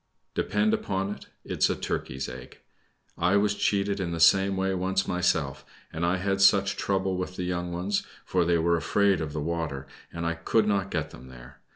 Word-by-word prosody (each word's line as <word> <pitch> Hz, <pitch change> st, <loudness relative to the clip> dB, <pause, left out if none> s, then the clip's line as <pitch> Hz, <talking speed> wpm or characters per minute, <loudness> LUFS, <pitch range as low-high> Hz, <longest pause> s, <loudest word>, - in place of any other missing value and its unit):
"Depend 215 Hz, +1 st, +1 dB
upon 100 Hz, -, -1 dB
it, -, -, -13 dB, 0.2 s
it -, -, -6 dB
is -, -, +4 dB
a -, -, 0 dB
turkey's 65 Hz, 0 st, -3 dB
egg. 65 Hz, 0 st, -10 dB, 0.6 s
I 90 Hz, +4 st, +3 dB
was 105 Hz, 0 st, +2 dB
cheated 100 Hz, 0 st, 0 dB
in 90 Hz, -3 st, -2 dB
the 85 Hz, -1 st, -3 dB
same 95 Hz, +4 st, +5 dB
way 95 Hz, 0 st, 0 dB
once 95 Hz, +1 st, 0 dB
myself, 85 Hz, -6 st, 0 dB, 0.3 s
and 80 Hz, -, -3 dB
I 90 Hz, +2 st, +2 dB
had 95 Hz, +1 st, -1 dB
such 100 Hz, 0 st, +5 dB
trouble 95 Hz, -1 st, -1 dB
with 90 Hz, 0 st, -4 dB
the 90 Hz, -, -3 dB
young 90 Hz, -1 st, -2 dB
ones; 90 Hz, +4 st, -1 dB, 0.2 s
for 90 Hz, -1 st, +1 dB
they 85 Hz, 0 st, +2 dB
were 85 Hz, +1 st, +2 dB
afraid 100 Hz, +2 st, +2 dB
of 75 Hz, -2 st, -3 dB
the 75 Hz, -, -4 dB
water, 80 Hz, -4 st, -3 dB, 0.3 s
and 85 Hz, 0 st, -4 dB
I 85 Hz, -, +1 dB
could 105 Hz, +6 st, +1 dB
not 100 Hz, -2 st, +1 dB
get 80 Hz, -4 st, -3 dB
them 65 Hz, +2 st, -12 dB
there. 65 Hz, -1 st, -13 dB
90 Hz, 205 wpm, -27 LUFS, 85-100 Hz, 0.6 s, same